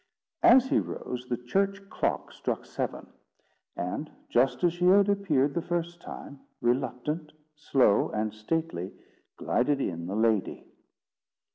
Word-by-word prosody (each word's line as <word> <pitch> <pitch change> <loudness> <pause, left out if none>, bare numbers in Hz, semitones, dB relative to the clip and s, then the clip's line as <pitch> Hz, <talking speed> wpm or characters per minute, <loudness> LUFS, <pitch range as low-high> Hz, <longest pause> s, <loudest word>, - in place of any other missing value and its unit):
As 265 -7 +7
he - - +4
rose, 125 0 -5
the 120 - 0
church 195 - -1
clock - - -1
struck - - -3
seven; - - -4 0.7
and, 90 - -3 0.2
just 125 +1 +2
as 175 -1 +4
she 175 +1 -1
had 195 +2 +6
appeared 155 -9 +2
the 170 - -1
first 170 0 -3
time, 140 - -9 0.2
reluctant, 135 +5 -1 0.2
slow, 135 -8 +3
and 105 0 -2
stately, 110 - -3 0.4
glided 140 +3 +1
in 85 -8 -3
the 95 - -3
lady. 110 -2 +1
140 Hz, 130 wpm, -28 LUFS, 120-175 Hz, 0.7 s, As